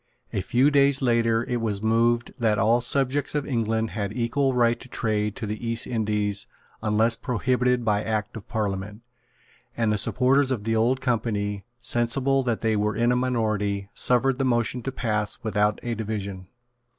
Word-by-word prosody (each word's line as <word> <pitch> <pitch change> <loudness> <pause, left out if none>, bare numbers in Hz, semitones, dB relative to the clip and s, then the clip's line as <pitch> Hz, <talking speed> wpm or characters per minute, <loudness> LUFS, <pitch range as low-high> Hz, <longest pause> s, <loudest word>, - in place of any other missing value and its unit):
A 95 - 0
few 125 +9 +3
days 140 -1 +4
later 115 -2 +2
it 120 -1 -1
was 105 -2 -2
moved 115 +2 +2
that 110 -3 +2
all 115 +5 +3
subjects 135 +3 0
of 145 -2 0
England 115 -4 -1
had 100 +1 -3
equal 130 +3 +1
right 120 -1 +2
to 130 - -11
trade 105 -3 -1
to 115 - -5
the 105 +2 -5
East 115 +1 -1
Indies 105 -3 -1 0.3
unless 110 +2 +2
prohibited 125 0 0
by 105 -1 +1
Act 110 -1 -2
of 110 - -9
Parliament; 105 0 -3 0.7
and 115 -2 +2
the 105 - +1
supporters 130 +5 +2
of 120 -6 -2
the 115 +1 0
Old 120 +4 +2
Company, 105 -5 -1
sensible 125 +3 +1
that 120 -4 -1
they 110 -1 +1
were 105 0 0
in 120 +2 +2
a - - +2
minority, 110 -5 -1
suffered 125 +1 +2
the - - +2
motion 120 -1 0
to 135 - -4
pass 105 -5 -2
without 105 -1 +1
a 120 - -2
division. 100 -4 -5
115 Hz, 175 wpm, -25 LUFS, 105-125 Hz, 0.7 s, days